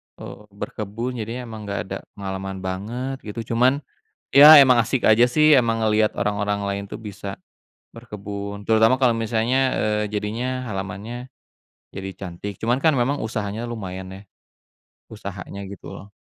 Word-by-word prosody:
eee, 105 Hz, -, -11 dB
berkebun 105 Hz, +3 st, -5 dB
jadinya 115 Hz, +3 st, -4 dB
emang 110 Hz, -3 st, -8 dB
gak 100 Hz, -, -2 dB
ada 95 Hz, -, -2 dB, 0.2 s
pengalaman 95 Hz, -1 st, -5 dB
banget 120 Hz, +8 st, -4 dB
gitu. 115 Hz, +2 st, -7 dB
Cuman 130 Hz, +5 st, +3 dB, 0.5 s
ya 150 Hz, +2 st, +11 dB
emang 125 Hz, -4 st, +7 dB
asik 125 Hz, +2 st, -1 dB
aja 110 Hz, +2 st, +6 dB
sih 155 Hz, +3 st, +5 dB
emang 115 Hz, -3 st, +3 dB
ngeliat 110 Hz, 0 st, +2 dB
orang-orang 105 Hz, 0 st, -1 dB
lain 100 Hz, 0 st, -2 dB
tuh -, -, -6 dB
bisa 100 Hz, -2 st, -7 dB, 0.5 s
berkebun, 100 Hz, -3 st, -7 dB
terutama 110 Hz, +3 st, +4 dB
kalo 130 Hz, -3 st, +3 dB
misalnya, 115 Hz, +4 st, +1 dB
eee, 105 Hz, 0 st, 0 dB
jadinya 115 Hz, +5 st, -3 dB
halamannya 105 Hz, +4 st, -6 dB, 0.7 s
jadi 95 Hz, 0 st, -5 dB
cantik 95 Hz, +1 st, -7 dB
cuman 120 Hz, +4 st, 0 dB
kan 160 Hz, -, +6 dB
memang 130 Hz, +4 st, +1 dB
usahanya 110 Hz, -1 st, -3 dB
lumayan 95 Hz, -5 st, -6 dB
ya, 95 Hz, -, -10 dB, 0.9 s
usahanya 100 Hz, -1 st, -7 dB
gitu 100 Hz, -1 st, -9 dB
loh. 100 Hz, +1 st, -11 dB
110 Hz, 145 wpm, -23 LUFS, 100-120 Hz, 0.9 s, ya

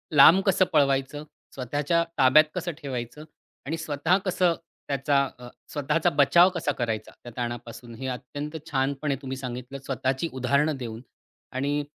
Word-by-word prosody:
लांब 160 Hz, +6 st, +8 dB
कसं 190 Hz, -1 st, +4 dB
पळवायचं, 140 Hz, 0 st, +2 dB, 0.3 s
स्वतःच्या 145 Hz, +6 st, 0 dB
ताब्यात 140 Hz, +3 st, +6 dB
कसं 175 Hz, -1 st, -2 dB
ठेवायचं 130 Hz, +1 st, -5 dB, 0.4 s
आणि 160 Hz, +4 st, -3 dB
स्वतः 160 Hz, +2 st, +1 dB
कसं 180 Hz, -2 st, +2 dB, 0.3 s
त्याचा 140 Hz, 0 st, +2 dB, 0.2 s
अ, 125 Hz, -, -10 dB, 0.3 s
स्वतःचा 150 Hz, +4 st, +1 dB
बचाव 170 Hz, +6 st, +6 dB
कसा 160 Hz, -4 st, 0 dB
करायचा, 115 Hz, -5 st, -3 dB
त्या 120 Hz, -, -9 dB
ताणापासून, 120 Hz, -1 st, -6 dB
हे 130 Hz, +3 st, -6 dB
अत्यंत 145 Hz, +5 st, -5 dB
छानपणे 140 Hz, +1 st, 0 dB
तुम्ही 135 Hz, -1 st, -5 dB
सांगितलं, 130 Hz, +1 st, -6 dB
स्वतःची 130 Hz, +4 st, -1 dB
उदाहरणं 140 Hz, +4 st, +1 dB
देऊन 115 Hz, -3 st, -6 dB, 0.5 s
आणि 145 Hz, +3 st, -1 dB
140 Hz, 135 wpm, -26 LUFS, 130-150 Hz, 0.5 s, लांब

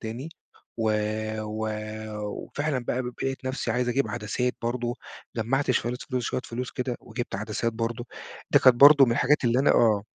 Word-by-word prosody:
تاني، 120 Hz, +7 st, -5 dB, 0.5 s
و 115 Hz, -, -2 dB, 0.6 s
و 110 Hz, +1 st, -3 dB, 0.8 s
وفعلًا 145 Hz, -2 st, -2 dB
بقى 125 Hz, +2 st, -1 dB
ب 125 Hz, -, -6 dB, 0.2 s
لقيت 135 Hz, 0 st, -3 dB
نفسي 130 Hz, -2 st, -2 dB
عايز 125 Hz, +1 st, 0 dB
أجيب 135 Hz, +3 st, +1 dB
عدسات 120 Hz, +2 st, -2 dB
برضه، 120 Hz, 0 st, -1 dB, 0.4 s
جمّعت 130 Hz, +5 st, 0 dB
شوية 125 Hz, -1 st, 0 dB
فلوس 125 Hz, -1 st, -1 dB
شوية 125 Hz, -, -1 dB
فلوس 125 Hz, +2 st, -5 dB
كده 125 Hz, -1 st, -3 dB
وجبت 120 Hz, -1 st, -6 dB
عدسات 110 Hz, +3 st, -2 dB
برضه، 115 Hz, +2 st, -3 dB, 0.4 s
دي -, -, +6 dB
كانت 130 Hz, -2 st, +6 dB
برضه 140 Hz, +2 st, +9 dB
من 120 Hz, -, +1 dB
الحاجات 135 Hz, +4 st, +2 dB
اللي 120 Hz, +1 st, +3 dB
أنا 135 Hz, -, +4 dB
آه. 110 Hz, -4 st, +4 dB
120 Hz, 170 wpm, -26 LUFS, 115-130 Hz, 0.8 s, برضه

